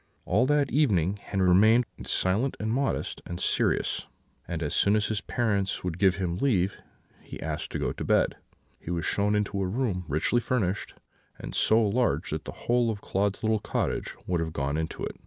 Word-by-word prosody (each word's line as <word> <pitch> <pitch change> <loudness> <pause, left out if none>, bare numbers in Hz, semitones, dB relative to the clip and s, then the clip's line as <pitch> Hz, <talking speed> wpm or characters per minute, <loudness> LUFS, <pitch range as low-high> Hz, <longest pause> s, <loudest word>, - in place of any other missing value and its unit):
"All 125 +5 +2
that 145 -1 +2
evening 100 - +2
Henri 95 -2 0
remained 110 +7 +5 0.2
silent, 105 +9 0
modest, 120 +6 -1
and 85 0 -5
serious, - - 0 0.4
and 85 -1 -3
as 75 - -2
soon 100 +1 +3
as 105 -1 +1
his 105 -2 -1
parents 100 -5 -1
would 90 -1 -3
give 95 -2 +4
him 90 -3 -2
leave, 95 -7 +1 0.4
he - - -9
asked 75 -1 -4
to - - -1
go - - -1
to - - -6
bed. - - +2 0.4
He - - -9
was 85 -2 -1
shown 105 +1 +2
into 100 -1 -1
a 95 - 0
room 100 -4 -1
richly 80 - +1
furnished, 105 -6 -1 0.4
and - - -7
so 110 +1 +4
large 120 +4 0
that - - -3
the - - -5
whole 120 -1 +3
of 110 -2 -2
Claude's 100 +2 -1
little 110 0 +2
cottage - - -2
would 90 -2 0
have 80 -1 -3
gone 70 -1 -1
into 80 0 -3
it. - - -4
100 Hz, 190 wpm, -27 LUFS, 90-115 Hz, 0.4 s, remained